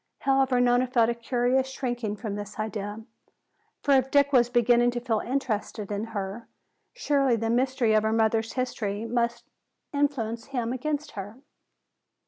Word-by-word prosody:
However, 270 Hz, -2 st, +2 dB
Nona 245 Hz, +1 st, +3 dB
felt 235 Hz, -2 st, +3 dB
a -, -, 0 dB
curious 245 Hz, +2 st, 0 dB
shrinking 240 Hz, -5 st, -3 dB
from 210 Hz, -1 st, -5 dB
this 205 Hz, 0 st, -7 dB
idea. 215 Hz, 0 st, -4 dB, 0.8 s
For 285 Hz, -, +1 dB
if 265 Hz, -1 st, +4 dB
Dick 280 Hz, 0 st, +3 dB
was 240 Hz, -2 st, +5 dB
beginning 240 Hz, 0 st, +4 dB
to 240 Hz, 0 st, -2 dB
feel 235 Hz, -3 st, 0 dB
interested 225 Hz, -5 st, -3 dB
in 205 Hz, +2 st, -2 dB
her, 210 Hz, 0 st, -5 dB, 0.4 s
surely 280 Hz, -, +1 dB
the 225 Hz, 0 st, -1 dB
mystery 250 Hz, -2 st, +2 dB
of 215 Hz, -, +4 dB
her 220 Hz, 0 st, 0 dB
mother's 225 Hz, 0 st, +1 dB
history 220 Hz, -4 st, -2 dB
must 235 Hz, 0 st, -1 dB, 0.5 s
influence 240 Hz, -6 st, -1 dB
him 245 Hz, -3 st, -2 dB
against 295 Hz, +3 st, -3 dB
her. 205 Hz, +2 st, -7 dB
240 Hz, 150 wpm, -27 LUFS, 220-260 Hz, 0.8 s, was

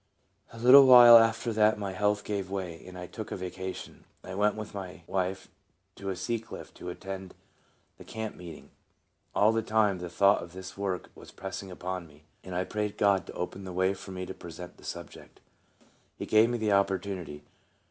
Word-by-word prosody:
A 115 Hz, -, -12 dB
little 130 Hz, +4 st, +8 dB
while 120 Hz, -2 st, +10 dB
after 115 Hz, +1 st, +1 dB
that 110 Hz, 0 st, +3 dB
my 100 Hz, -2 st, -4 dB
health 105 Hz, +2 st, 0 dB
gave 100 Hz, -3 st, -3 dB
way, 90 Hz, -4 st, -5 dB
and 90 Hz, 0 st, -10 dB
I 90 Hz, -, -6 dB
took 110 Hz, +4 st, -8 dB
a -, -, -2 dB
vacation. 95 Hz, 0 st, -7 dB, 0.2 s
I 95 Hz, -, -8 dB
went 105 Hz, +2 st, +1 dB
with 110 Hz, 0 st, -7 dB
my 90 Hz, -4 st, -8 dB
wife 95 Hz, +1 st, -2 dB, 0.5 s
to 95 Hz, -1 st, -4 dB
Sea 105 Hz, +6 st, -2 dB
Cliff 115 Hz, -, -11 dB
to 90 Hz, -, -8 dB
attend 95 Hz, +1 st, -7 dB, 0.6 s
the -, -, -10 dB
camp 110 Hz, -1 st, -6 dB
meeting. 85 Hz, -3 st, -11 dB, 0.6 s
All 105 Hz, +2 st, +5 dB
the 115 Hz, 0 st, 0 dB
time 105 Hz, -3 st, +1 dB
the 90 Hz, 0 st, -6 dB
thought 100 Hz, +3 st, +3 dB
of 85 Hz, 0 st, -10 dB
this 95 Hz, 0 st, -9 dB
work 95 Hz, -2 st, -4 dB
was -, -, -14 dB
pressing 95 Hz, 0 st, -7 dB
upon 90 Hz, -1 st, -5 dB
me, 75 Hz, 0 st, -20 dB, 0.2 s
and 90 Hz, -1 st, -7 dB
I 90 Hz, -, 0 dB
prayed 105 Hz, +1 st, -3 dB
God 100 Hz, -3 st, +2 dB
to -, -, -8 dB
open 95 Hz, +2 st, -5 dB
the 95 Hz, -, -7 dB
way 95 Hz, +2 st, +1 dB
for 95 Hz, -, -11 dB
me 95 Hz, -1 st, -5 dB
to 95 Hz, -, -7 dB
present 85 Hz, 0 st, -10 dB
the -, -, -18 dB
subject. -, -, -9 dB, 0.8 s
He -, -, -5 dB
gave 110 Hz, +2 st, +4 dB
me 120 Hz, -, -1 dB
the 110 Hz, -2 st, 0 dB
opportunity. 95 Hz, -6 st, -1 dB
95 Hz, 195 wpm, -29 LUFS, 90-105 Hz, 0.8 s, while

